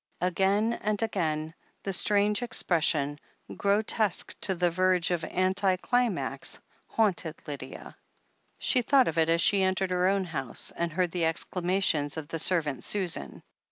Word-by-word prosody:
Again 195 +5 +1
and 210 -1 -1
again, 160 -7 -2 0.3
the 195 - -2
strange 205 +3 +2
expression, 160 - +1 0.4
grotesque 205 0 0
to 190 - +2
the 175 0 +1
verge 185 0 +1
of 175 -2 -1
anti 185 +1 +1
climax, 245 0 -1 0.3
haunted 185 -7 0
Lydia. 135 -3 -8 0.6
She 255 - +2
thought 265 +1 +4
of 165 0 -1
it 160 0 +2
as 165 0 +3
she 200 +1 +3
entered 190 0 0
her 180 0 +2
own 195 0 +1
house, 135 -9 -4
and 170 0 -2
heard 180 +1 0
the 175 -2 0
exclamations 170 -2 0
of 150 -2 -6
the 165 - -3
servant 155 -6 +1
Susan. 175 - -1
180 Hz, 145 wpm, -28 LUFS, 165-200 Hz, 0.6 s, thought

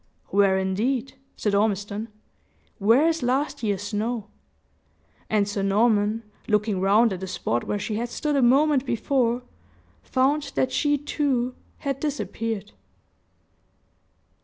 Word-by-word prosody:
"Where, 195 -1 +3
indeed?" 225 +8 -1 0.2
said 210 - -1
Ormiston; 205 +1 0 0.7
"where 230 +10 +5
is 330 -1 0
last 270 +4 0
year's 205 -3 -1
snow?" 215 +1 -3 1.0
And 210 -2 +2
Sir 205 -1 -2
Norman, 210 +2 +2 0.2
looking 210 -2 +1
round 205 +3 +4
at 185 - -5
the 190 - -5
spot 120 -9 -2
where 205 - -1
she 210 +1 -3
had 240 +2 -2
stood 295 +4 -1
a 275 - +3
moment 270 +2 +4
before, 245 -1 0 0.6
found 275 +2 0
that 260 - +1
she, 290 +1 +2
too, 270 -4 -1 0.2
had 275 -2 -3
disappeared. 225 -8 -3
230 Hz, 125 wpm, -25 LUFS, 205-270 Hz, 1.0 s, where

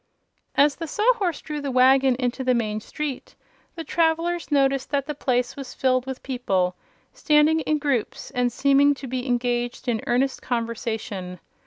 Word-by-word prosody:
As 285 0 +4
the 330 - -5
Sawhorse 415 - +1
drew 300 -1 -5
the 285 - -3
wagon 260 0 +4
into 250 +1 -2
the 255 -1 +2
main 215 -2 -1
street 290 +2 -6 0.4
the 330 - -5
travelers 335 +1 0
noticed 275 -2 +2
that 280 -2 0
the 300 - -4
place 250 -3 -1
was 270 -3 -8
filled 255 -1 +1
with 265 -1 -6
people, 190 -9 -1 0.4
standing 315 -8 +3
in 310 -1 0
groups 280 -6 -2
and 250 -2 0
seeming 280 +3 +4
to 275 - -9
be 255 +1 -4
engaged 245 0 -1
in 230 -3 0
earnest 255 +3 +1
conversation. 220 -6 -4
265 Hz, 160 wpm, -24 LUFS, 245-295 Hz, 0.4 s, As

